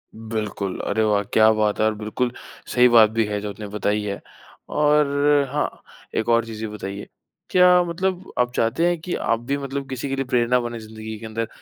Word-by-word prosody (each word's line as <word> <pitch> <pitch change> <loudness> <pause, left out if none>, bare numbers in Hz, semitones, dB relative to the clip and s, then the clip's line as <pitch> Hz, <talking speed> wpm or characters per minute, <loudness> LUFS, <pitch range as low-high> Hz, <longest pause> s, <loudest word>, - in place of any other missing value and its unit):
बिल्कुल, 110 -3 -4
अरे 110 +2 0
वाह! 105 -1 +2
क्या 110 0 +6
बात 105 -1 0
है 110 - +3
और 110 - +2
बिल्कुल 110 +4 -2 0.4
सही 125 0 +6
बात 115 -2 +7
भी 115 0 +1
है 105 0 -2
जो 105 - -4
आपने 105 +1 -7
बताई 105 0 -1
है। 100 -1 -4 0.5
और 150 0 +4 0.5
हाँ, 150 +1 -3 0.3
एक 110 - -1
और 115 0 +3
चीज़ 110 -1 -8
ये - - -2
बताइए 100 -1 -6 0.4
क्या 180 -1 +6
मतलब 185 +2 -3
आप 125 0 +2
चाहते 115 +9 +1
हैं 175 -1 0
कि 175 +2 -4
आप 115 - 0
भी 140 +1 0
मतलब 140 0 -5
किसी 130 +1 -4
के 135 - -1
लिए 135 0 -2
प्रेरणा 125 0 +2
बने 120 -1 -4
ज़िंदगी 110 0 -8
के 115 - -9
अंदर? 110 +1 -3
115 Hz, 205 wpm, -22 LUFS, 110-135 Hz, 0.5 s, बात